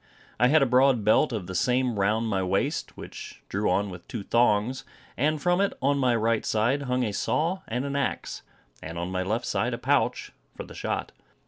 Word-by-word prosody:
I 125 - +5
had 150 +2 +5
a - - +4
broad 130 -2 +3
belt 110 +4 +3
of 110 -6 -3
the 95 - -7
same 125 +6 +1
round 105 +3 +1
my 95 -3 0
waist, 95 - -1
which - - -9
drew 100 +2 0
on 100 +2 0
with 90 -1 -11
two 110 -4 -5
thongs; 120 +2 +2 0.3
and 155 +1 +1
from 175 +4 +2
it, 200 - +1
on 140 +1 +1
my 125 -3 +2
right 115 0 +1
side, 120 +6 +1
hung 125 -2 0
a 110 - -1
saw 165 - 0
and 125 +4 -2
an 140 0 -3
axe; 140 -2 -2 0.4
and 80 +1 -7
on 85 +2 -3
my 95 0 -1
left 110 +6 -2
side - - -1
a - - -7
pouch - - 0 0.3
for - - -5
the - - -12
shot. - - -3
120 Hz, 210 wpm, -26 LUFS, 100-135 Hz, 0.4 s, I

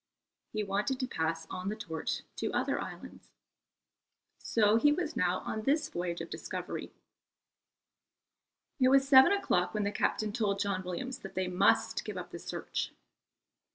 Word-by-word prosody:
He 215 -1 -1
wanted 205 +6 -1
to 255 - -1
pass 165 -6 -2
on 185 +2 -3
the 210 - -2
torch 165 -8 -4
to - - -1
other - - 0
islands. - - -9 1.1
So 215 -1 +3
he 295 +5 +5
was 305 -2 -1
now 180 -4 +1
on 220 - -3
this 295 +5 +1
voyage 175 -1 -3
of 165 - -7
discovery. - - -5 1.9
It 255 - +5
was 270 +1 +5
seven 265 +2 +8
o'clock 220 - +1
when 210 - +1
the 200 - 0
captain 210 +1 0
told 205 -4 0
John 200 -2 -1
Williams 250 +9 -4
that 195 - -10
they 185 0 0
must 180 0 +2
give - - -6
up - - -6
the - - -7
search. - - -4
210 Hz, 155 wpm, -31 LUFS, 180-260 Hz, 1.9 s, seven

